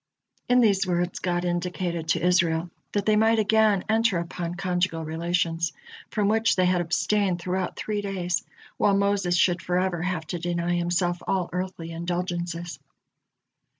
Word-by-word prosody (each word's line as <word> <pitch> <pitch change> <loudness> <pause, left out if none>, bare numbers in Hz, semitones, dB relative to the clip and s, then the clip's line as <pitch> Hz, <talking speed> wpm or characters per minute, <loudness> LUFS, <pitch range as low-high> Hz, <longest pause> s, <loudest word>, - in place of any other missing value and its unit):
In 250 0 +5
these 200 -4 +3
words 175 0 -1
God 175 -1 -1
indicated 175 -1 -2
to 165 +1 +1
Israel 170 -2 +2 0.2
that 205 -1 0
they 215 - +4
might 220 +1 +4
again 215 -2 +3
enter 225 -3 +2
upon 170 0 -4
conjugal 180 -3 -1
relations, 165 +1 -1 0.4
from 210 -2 0
which 220 +2 +3
they 185 - +3
has 180 -1 +2
abstained 180 +2 +1
throughout 185 +1 -2
three 210 -1 -2
days, 185 -3 -2 0.3
while 200 -1 +3
Moses 200 -3 +1
should 175 0 +3
forever 180 0 0
have 180 -3 -2
to 175 - -2
deny 175 0 -1
himself 175 0 0
all 185 -3 0
earthly 180 -2 -4
indulgences. 175 -2 -3
180 Hz, 150 wpm, -25 LUFS, 170-195 Hz, 0.4 s, In